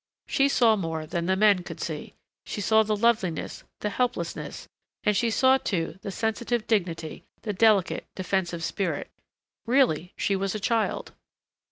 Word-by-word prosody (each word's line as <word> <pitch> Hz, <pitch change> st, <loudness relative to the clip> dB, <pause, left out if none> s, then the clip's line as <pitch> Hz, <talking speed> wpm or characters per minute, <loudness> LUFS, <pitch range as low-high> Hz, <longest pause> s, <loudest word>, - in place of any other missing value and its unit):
She 275 Hz, +1 st, +3 dB
saw 235 Hz, -5 st, +4 dB
more 165 Hz, -5 st, -3 dB
than 170 Hz, +2 st, -3 dB
the 190 Hz, -, +3 dB
men 205 Hz, -2 st, +4 dB
could -, -, -8 dB
see. 155 Hz, -3 st, -5 dB, 0.3 s
She -, -, -5 dB
saw 220 Hz, +2 st, +4 dB
the 215 Hz, 0 st, 0 dB
loveliness, 210 Hz, -6 st, 0 dB, 0.2 s
the 210 Hz, -, -1 dB
helplessness, 220 Hz, -8 st, -3 dB, 0.4 s
and 210 Hz, -, +2 dB
she 230 Hz, +4 st, +2 dB
saw 260 Hz, +3 st, +4 dB
too 170 Hz, -6 st, -2 dB
the -, -, -5 dB
sensitive 225 Hz, +2 st, -1 dB
dignity, 170 Hz, -7 st, -1 dB, 0.2 s
the 210 Hz, -, -2 dB
delicate, 205 Hz, -2 st, +3 dB
defensive 180 Hz, -3 st, -1 dB
spirit.... 170 Hz, -4 st, -2 dB, 0.6 s
Really, 235 Hz, -, +2 dB
she 200 Hz, -, +1 dB
was 195 Hz, +1 st, -1 dB
a -, -, -2 dB
child. 225 Hz, +1 st, -1 dB
200 Hz, 155 wpm, -26 LUFS, 175-225 Hz, 0.6 s, saw